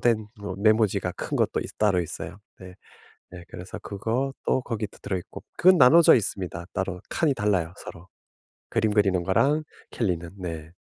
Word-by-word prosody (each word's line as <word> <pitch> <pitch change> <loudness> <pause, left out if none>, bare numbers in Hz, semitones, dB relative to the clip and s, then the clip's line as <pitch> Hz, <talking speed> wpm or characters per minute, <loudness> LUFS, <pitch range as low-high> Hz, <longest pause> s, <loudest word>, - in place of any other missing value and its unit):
된 110 -3 +1
뭐 100 -2 -5
메모지가 105 -4 +2
큰 - - -4
것도 - - +1
있 - - -6
따로 100 -4 +3
있어요. 85 - -6 0.2
네. 90 -1 -11 0.6
네 90 -1 -10
그래서 90 +1 -8
그것도 125 +6 -2
거기도 110 -4 -4
들어 95 - -2
있고. - - -10
그건 185 0 +6
나눠져 165 +6 +8
있습니다 90 -5 -3
따로. 95 -1 -3
칸이 155 -4 +2
달라요 95 -6 0
서로. 85 +1 -11 0.6
그림 110 -2 +1
그리는 95 -4 +2
거랑 140 - +2 0.3
캘리는. 85 -7 -2
네. 80 -3 -6
100 Hz, 325 characters per minute, -25 LUFS, 90-115 Hz, 0.6 s, 나눠져